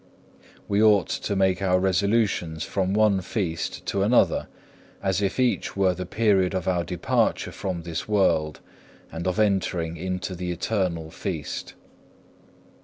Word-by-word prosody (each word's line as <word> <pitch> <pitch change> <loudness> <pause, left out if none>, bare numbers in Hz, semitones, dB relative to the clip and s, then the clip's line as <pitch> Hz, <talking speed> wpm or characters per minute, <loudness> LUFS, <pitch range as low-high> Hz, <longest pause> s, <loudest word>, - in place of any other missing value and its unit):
We 100 +1 +2
ought 105 -4 +4
to 100 - -2
make 95 -1 +2
our 90 -1 +3
resolutions 95 -3 +1
from 95 0 -1
one 105 -3 +3
Feast 85 -4 -3
to 100 - -1
another, 115 +5 +3 0.6
as 95 0 +1
if 100 +4 -1
each 125 -5 0
were 95 -2 +3
the 90 0 -6
period 100 -3 +2
of 90 -2 -2
our 90 -2 +1
departure 90 -1 0
from 90 -4 -4
this 80 -1 -4
world, 80 -8 +1 0.5
and 85 +2 -4
of 90 - 0
entering 95 -5 0
into 90 +2 -3
the 90 0 -4
eternal 90 -3 -2
feast. 85 -6 -5
95 Hz, 140 wpm, -25 LUFS, 85-100 Hz, 0.6 s, ought